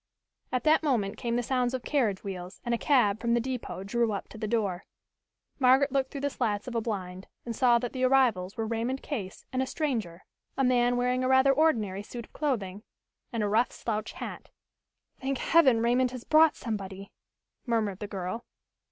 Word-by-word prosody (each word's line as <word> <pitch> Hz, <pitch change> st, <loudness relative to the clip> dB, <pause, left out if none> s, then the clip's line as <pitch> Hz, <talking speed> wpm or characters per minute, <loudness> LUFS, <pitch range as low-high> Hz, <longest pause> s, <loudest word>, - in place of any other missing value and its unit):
At 255 Hz, -2 st, 0 dB
that 310 Hz, +1 st, +4 dB
moment 235 Hz, -10 st, 0 dB
came 235 Hz, -1 st, -2 dB
the 245 Hz, -, 0 dB
sounds 250 Hz, 0 st, 0 dB
of 255 Hz, -, -5 dB
carriage 225 Hz, -10 st, 0 dB
wheels 185 Hz, -1 st, -7 dB
and 240 Hz, -, 0 dB
a -, -, +2 dB
cab 220 Hz, -8 st, +3 dB
from 235 Hz, 0 st, +1 dB
the -, -, +3 dB
depot 245 Hz, -6 st, -4 dB
drew 230 Hz, +2 st, 0 dB
up 200 Hz, -, -5 dB
to -, -, -11 dB
the 215 Hz, -, -2 dB
door. 205 Hz, -5 st, -1 dB, 0.8 s
Margaret 265 Hz, +2 st, +5 dB
looked 265 Hz, -1 st, 0 dB
through 280 Hz, -, -6 dB
the 285 Hz, -, 0 dB
slats 210 Hz, -3 st, -2 dB
of 250 Hz, -, -5 dB
a 230 Hz, -, 0 dB
blind 190 Hz, -4 st, -5 dB, 0.2 s
and 235 Hz, -1 st, -4 dB
saw 245 Hz, -1 st, +4 dB
that 240 Hz, 0 st, -4 dB
the 260 Hz, -1 st, -2 dB
arrivals 245 Hz, -8 st, +2 dB
were 225 Hz, -, -1 dB
Raymond 235 Hz, +4 st, -2 dB
Case 205 Hz, -11 st, -5 dB
and 255 Hz, -, +1 dB
a 260 Hz, -, -1 dB
stranger, 225 Hz, -, -3 dB, 0.3 s
a 270 Hz, -, +2 dB
man 245 Hz, -1 st, +3 dB
wearing 250 Hz, +1 st, +1 dB
a -, -, +1 dB
rather 265 Hz, +1 st, +5 dB
ordinary 225 Hz, -11 st, +1 dB
suit 235 Hz, +2 st, -8 dB
of -, -, -30 dB
clothing 210 Hz, -10 st, -2 dB, 0.5 s
and 230 Hz, -2 st, -1 dB
a -, -, +1 dB
rough 225 Hz, +4 st, +2 dB
slouch 215 Hz, -2 st, -4 dB
hat. -, -, -7 dB, 0.7 s
"Thank 270 Hz, 0 st, -1 dB
Heaven, 265 Hz, -9 st, +4 dB
Raymond 245 Hz, +2 st, +3 dB
has 250 Hz, -1 st, -8 dB
brought 310 Hz, 0 st, +5 dB
somebody!" 195 Hz, -3 st, -6 dB, 0.6 s
murmured 215 Hz, -5 st, 0 dB
the 210 Hz, -, -5 dB
girl. 195 Hz, +3 st, -4 dB
235 Hz, 195 wpm, -28 LUFS, 205-260 Hz, 0.8 s, Margaret